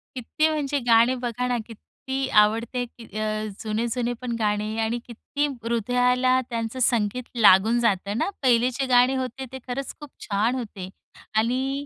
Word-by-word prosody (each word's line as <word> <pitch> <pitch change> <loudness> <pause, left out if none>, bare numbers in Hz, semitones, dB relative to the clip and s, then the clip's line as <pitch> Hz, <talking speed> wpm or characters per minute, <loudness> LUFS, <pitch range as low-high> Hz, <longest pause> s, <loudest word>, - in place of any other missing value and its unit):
किती 280 +5 0
म्हणजे 290 -2 -1
गाणे 235 +2 +5
बघा 245 +1 -2
ना, 245 -1 0
किती 265 +4 -5
आवडते 230 +4 0
की 235 -1 -15 0.2
अ, 215 0 -2 0.2
जुने-जुने 235 +2 -1
पण 240 -2 -3
गाणे 210 0 -1
आणि 225 +2 -1
किती 285 +5 -3 0.2
हृदयाला 250 +2 +2
त्यांचं 230 +2 -3
संगीत 235 0 +1
लागून 220 +2 +5
जातं 205 -2 0
ना. 310 - 0
पहिले 245 0 +4
जे 270 +2 -2
गाणे 250 +2 +5
होते, 260 0 -4
ते 265 - -7
खरंच 260 +2 -4
खूप 295 -2 -10 0.2
छान 215 +5 +1
होते 205 -6 -6 0.5
आणि. 265 +5 0
240 Hz, 150 wpm, -24 LUFS, 225-255 Hz, 0.5 s, गाणे